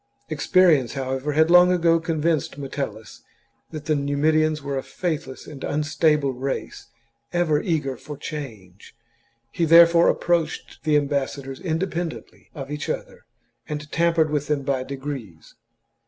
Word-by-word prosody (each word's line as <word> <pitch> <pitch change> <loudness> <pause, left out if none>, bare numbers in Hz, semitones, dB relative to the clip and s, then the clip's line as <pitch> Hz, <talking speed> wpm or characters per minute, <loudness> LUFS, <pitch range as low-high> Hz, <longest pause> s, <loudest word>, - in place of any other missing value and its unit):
Experience, 170 -10 +3
however, 135 +2 -3
had 160 +2 +3
long 180 0 +7
ago 165 -2 +3
convinced 160 -3 -1
Metel 135 -5 -4
lus 110 0 -14 0.5
that 155 -2 -8
the 155 - +1
Numidians 150 +2 +1
were 140 -1 -3
a 135 - -1
faithless 160 -6 -4
and 145 -3 -10
unstable 150 -1 +1
race, 130 +2 -5 0.4
ever 160 -4 +1
eager 150 -6 -1
for 150 +3 -9
change. 110 -12 -9 0.6
He 170 - -2
therefore 170 +1 +7
approached 170 -3 -1
the 150 -1 +4
ambassadors 140 -2 -2
independently 170 -1 -4
of 140 -1 -7
each 150 0 -4
other, - - -5 0.4
and 150 -1 -5
tampered 165 -2 +2
with 145 -1 -1
them 150 -2 0
by 135 -1 -1
degrees. 130 - -7
150 Hz, 135 wpm, -23 LUFS, 135-165 Hz, 0.6 s, long